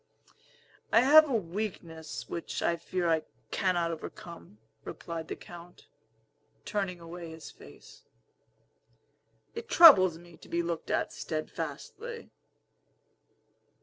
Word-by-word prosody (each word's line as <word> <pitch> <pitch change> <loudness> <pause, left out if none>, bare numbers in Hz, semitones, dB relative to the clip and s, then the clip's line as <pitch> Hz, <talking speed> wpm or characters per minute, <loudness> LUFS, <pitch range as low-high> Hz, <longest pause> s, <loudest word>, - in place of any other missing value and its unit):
"I 230 - +6
have 305 +4 +7
a 255 - 0
weakness 170 -5 -5
which 170 - -5
I 170 - +2
fear 175 +1 -3
I 160 -1 +2 0.3
cannot 175 -3 0
overcome," 165 - -10 0.3
replied 165 -1 -7
the - - -5
Count, 175 0 -13 0.8
turning 195 -4 -3
away 170 0 -9
his 160 -1 -10
face. - - -16 1.5
"It 460 0 -8
troubles 185 - +8
me 175 0 -16
to - - -17
be 170 0 -1
looked 170 -1 -4
at - - -1
steadfastly." 460 - -6
175 Hz, 110 wpm, -29 LUFS, 165-205 Hz, 1.5 s, troubles